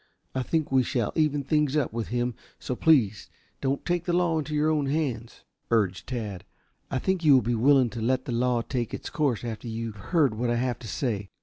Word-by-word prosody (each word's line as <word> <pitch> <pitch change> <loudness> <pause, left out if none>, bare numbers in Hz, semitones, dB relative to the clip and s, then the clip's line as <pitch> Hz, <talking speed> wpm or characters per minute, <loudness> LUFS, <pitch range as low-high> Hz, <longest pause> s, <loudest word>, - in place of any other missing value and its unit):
"I 130 - -1
think 155 +3 -1
we 130 -1 +5
shall 120 -4 -1
even 150 -3 +1
things 150 0 +1
up 140 -7 0
with 115 -1 -3
him, 120 0 -1 0.2
so 125 - -4
please 120 -10 +3 0.3
don't 135 0 -1
take 175 -1 0
the 175 - 0
law 175 -2 +2
into 155 0 -3
your 150 +1 +2
own 150 -3 +1
hands," 135 -6 -2 0.3
urged 105 -5 +1
Tad. 110 -8 -4 0.5
"I - - -1
think 185 +6 0
you 145 -3 +7
will 130 - +4
be 120 +3 0
willing 130 +1 +4
to 120 - -5
let 130 +3 +1
the - - -4
law 120 0 +1
take 120 -3 -3
its - - -7
course 135 -8 0
after 115 0 -5
you 115 0 -4
have 100 -3 -13
heard 155 -9 +3
what 120 +3 -1
I 120 - +2
have 120 -1 -1
to 120 - -9
say. 105 -3 -2
125 Hz, 225 wpm, -27 LUFS, 115-150 Hz, 0.5 s, you